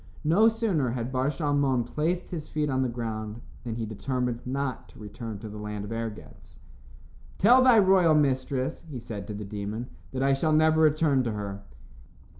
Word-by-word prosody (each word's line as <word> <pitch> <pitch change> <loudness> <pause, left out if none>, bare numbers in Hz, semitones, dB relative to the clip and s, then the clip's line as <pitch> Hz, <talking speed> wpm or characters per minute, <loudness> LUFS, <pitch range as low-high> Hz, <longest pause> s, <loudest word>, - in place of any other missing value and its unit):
No 175 +9 +5
sooner 210 - 0
had 120 +1 -3
Bar 130 +1 0
Shalmon 140 -3 +1
placed 170 +4 -2
his 160 -4 -5
feet 150 -2 -1
on 130 0 +1
the 130 - +1
ground 110 -2 -4 0.2
than 115 -3 -4
he 115 -1 -3
determined 125 +2 -2
not 130 -9 -3
to - - -17
return 105 +1 -7
to 110 - -8
the 105 0 -8
land 105 -1 -5
of 105 - -8
Ergetz. 115 -2 -7 0.8
"Tell 245 +5 +6
thy 255 -3 +7
royal 185 -5 +5
mistress," 135 0 0
he 140 - -6
said 105 -4 -7
to 105 - -5
the 105 0 -6
demon, 105 +4 -5 0.2
"that 130 0 -2
I 135 0 +4
shall 155 +3 +1
never 155 +1 +4
return 150 -3 +3
to 115 - -1
her." 100 -1 -5
130 Hz, 185 wpm, -27 LUFS, 110-155 Hz, 0.8 s, thy